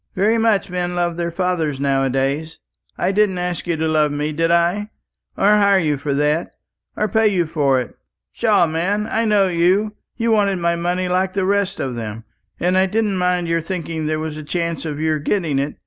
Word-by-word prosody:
"Very 215 +5 +2
much 220 -4 +1
men 180 0 -2
love 175 -1 0
their 170 0 -2
fathers 170 -5 -1
now 135 -1 +1
a 135 - +1
days! 140 +5 -2 0.4
I - - +1
didn't 200 -2 +2
ask 180 0 -3
you 170 -2 0
to 160 +1 0
love 155 -2 +2
me, 150 +1 -2
did 165 +2 0
I? 175 +5 +1 0.5
or - - +1
hire 200 -1 +5
you 155 -5 +1
for 140 0 -2
that, 150 +3 0 0.4
or 215 - +1
pay 220 +2 +2
you 185 -4 +1
for 145 -5 +1
it? 125 - -6 0.4
Pshaw, - - +3
man, 180 +6 -1
I 225 +1 -1
know 205 -3 +3
you. 185 +5 +2 0.2
You 230 -1 0
wanted 200 -3 +2
my 170 0 +1
money 175 +2 -1
like 185 +1 0
the 195 -2 0
rest 200 0 0
of 130 - -2
them, 110 -1 -6 0.4
and 180 +2 +2
I 190 - +3
didn't 210 -1 0
mind 180 -1 +1
your 165 0 0
thinking 165 -2 -4
there 155 0 0
was 155 -1 -4
a 155 - -7
chance 170 +1 -3
of 150 -2 -4
your 155 -1 0
getting 155 -3 0
it. 140 +2 -2
175 Hz, 210 wpm, -20 LUFS, 155-195 Hz, 0.5 s, hire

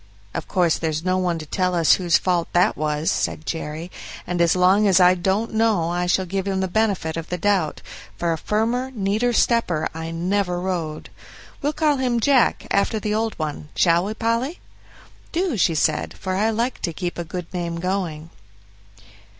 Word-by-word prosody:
"Of - - -4
course 175 -4 +2
there's 160 0 -2
no 185 0 +2
one 175 -2 0
to 155 - -7
tell 180 +3 0
us 165 -2 +5
whose 175 -3 +3
fault 175 -2 0
that 175 +1 +3
was," 150 +1 0
said 155 - -2
Jerry, 160 +2 -5 0.3
"and 175 -1 -1
as 170 0 +4
long 190 +3 +4
as 190 -1 +5
I 180 0 +7
don't 190 +6 -1
know 215 -7 +2
I 175 0 -1
shall 185 +1 +2
give 195 +2 -3
him 190 -1 0
the 190 - 0
benefit 195 -5 0
of 165 -1 -6
the 180 - -2
doubt; 185 -4 0 0.3
for 170 -1 0
a - - -3
firmer, 235 +5 0
neater 215 +4 +1
stepper 230 -9 +2
I 160 0 -5
never 180 +2 -1
rode. 175 -4 -4 0.5
We'll 295 +2 0
call 300 -2 +2
him 250 -2 +1
'Jack', 260 +1 +3
after 205 +2 +1
the 210 0 -2
old 220 +1 -1
one 150 -1 -4
shall 170 +1 +3
we, 215 +2 -4
Polly?" 230 - -1 0.7
"Do," 345 -4 0
she 170 -5 +2
said, 155 0 0
"for 185 -1 -3
I 210 +4 +2
like 235 +3 -1
to 170 - -2
keep 175 +1 -4
a - - -1
good 175 +1 -6
name 170 -2 -3
going." 170 -4 -3
185 Hz, 190 wpm, -22 LUFS, 170-215 Hz, 0.7 s, I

